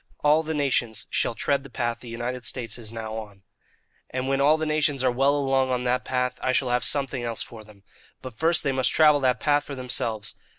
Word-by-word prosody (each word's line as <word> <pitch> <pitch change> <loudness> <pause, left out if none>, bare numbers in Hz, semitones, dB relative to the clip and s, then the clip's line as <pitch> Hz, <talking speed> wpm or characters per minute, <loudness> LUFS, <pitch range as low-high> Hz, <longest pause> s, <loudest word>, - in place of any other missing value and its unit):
All 150 +2 +5
the 160 0 -4
nations 125 -6 0
shall - - 0
tread 140 +3 0
the 135 - -11
path 120 -1 -2
the 120 - -11
United 120 +2 -4
States 120 -2 -2
is 110 -2 -4
now 110 -1 -6
on. 105 -3 -9 0.7
"And 130 0 -3
when 135 0 +1
all 150 +3 +5
the 160 - -2
nations 155 -3 +1
are 130 - +3
well 135 +3 +3
along 135 -2 +1
on 125 -1 0
that 125 0 0
path, 125 -1 -1
I 130 - +1
shall 130 -1 +1
have 125 0 +1
something 135 0 -1
else 115 -2 -3
for 110 -2 -11
them. 105 -2 -18 0.4
But 130 - -8
first 165 +6 +3
they 140 - +1
must 130 -1 +2
travel 150 -2 +5
that 125 -3 +2
path 145 +1 +2
for 145 - -7
themselves. 120 -4 -3
130 Hz, 225 wpm, -25 LUFS, 120-140 Hz, 0.7 s, All